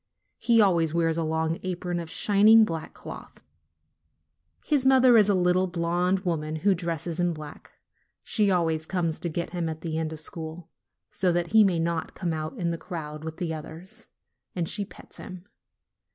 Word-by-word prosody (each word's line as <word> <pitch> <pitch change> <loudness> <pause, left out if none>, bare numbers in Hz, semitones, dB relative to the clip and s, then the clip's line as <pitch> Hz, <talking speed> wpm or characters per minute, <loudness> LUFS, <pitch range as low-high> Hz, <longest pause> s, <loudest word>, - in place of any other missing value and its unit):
He 230 -1 +3
always 170 -6 +3
wears 165 -1 +1
a 165 - -1
long 160 +1 -1
apron 180 -1 -3
of 165 -1 -6
shining 215 +4 +5
black 165 -4 -5
cloth. - - -11 1.2
His 290 -4 +2
mother 260 -2 +6
is 210 -2 +5
a 200 - +4
little 180 +1 +2
blonde 175 +2 0
woman 160 -4 -2
who 200 - +6
dresses 170 -1 -4
in 175 -1 +1
black. 155 -1 -11 0.5
She 210 -3 +2
always 165 -4 0
comes 170 -4 -1
to 170 - -3
get 170 +2 -4
him 175 -2 -2
at 160 0 -6
the 160 -1 -3
end 160 -1 -2
of 160 - -5
school, 160 +1 -6 0.4
so 185 -2 +1
that 170 -1 -1
he 220 0 +7
may 190 -4 +2
not 165 0 -2
come 170 -3 -2
out 155 +8 -5
in 170 -4 -1
the 165 - -4
crowd 155 -4 -7
with 160 0 -6
the 170 -2 -3
others, 160 +6 -9 0.5
and 170 -3 -1
she 205 +3 -2
pets - - -15
him. 185 -1 -9
170 Hz, 180 wpm, -26 LUFS, 160-185 Hz, 1.2 s, he